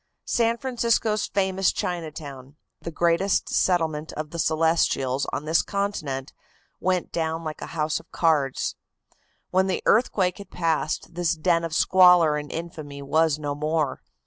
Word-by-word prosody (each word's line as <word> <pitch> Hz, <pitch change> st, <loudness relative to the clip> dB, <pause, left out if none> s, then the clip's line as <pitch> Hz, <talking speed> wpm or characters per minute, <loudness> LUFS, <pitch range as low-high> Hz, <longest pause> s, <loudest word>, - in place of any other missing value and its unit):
San 230 Hz, 0 st, +1 dB
Francisco's 230 Hz, -4 st, 0 dB
famous 190 Hz, -1 st, +1 dB
Chinatown, 150 Hz, -6 st, -5 dB, 0.3 s
the -, -, -5 dB
greatest 170 Hz, +4 st, +1 dB
settlement 160 Hz, -4 st, 0 dB
of 155 Hz, 0 st, -5 dB
the 170 Hz, -, -6 dB
Celestials 155 Hz, -5 st, +1 dB
on 150 Hz, -, -4 dB
this 160 Hz, +1 st, +3 dB
continent, 155 Hz, -10 st, -3 dB, 0.5 s
went 185 Hz, -1 st, 0 dB
down 165 Hz, 0 st, -2 dB
like 155 Hz, -1 st, -6 dB
a -, -, -5 dB
house 155 Hz, 0 st, 0 dB
of -, -, -20 dB
cards. 150 Hz, -5 st, +1 dB, 0.8 s
When 190 Hz, +1 st, +3 dB
the 190 Hz, -, -2 dB
earthquake 200 Hz, -5 st, +2 dB
had 200 Hz, -2 st, -10 dB
passed 160 Hz, -4 st, -1 dB
this 175 Hz, -1 st, 0 dB
den 170 Hz, +1 st, +1 dB
of 165 Hz, -1 st, -3 dB
squalor 180 Hz, -4 st, +6 dB
and 150 Hz, 0 st, -5 dB
infamy 155 Hz, -4 st, -7 dB
was 155 Hz, +1 st, +2 dB
no 145 Hz, -2 st, -3 dB
more. 150 Hz, 0 st, -1 dB
165 Hz, 145 wpm, -25 LUFS, 150-185 Hz, 0.8 s, squalor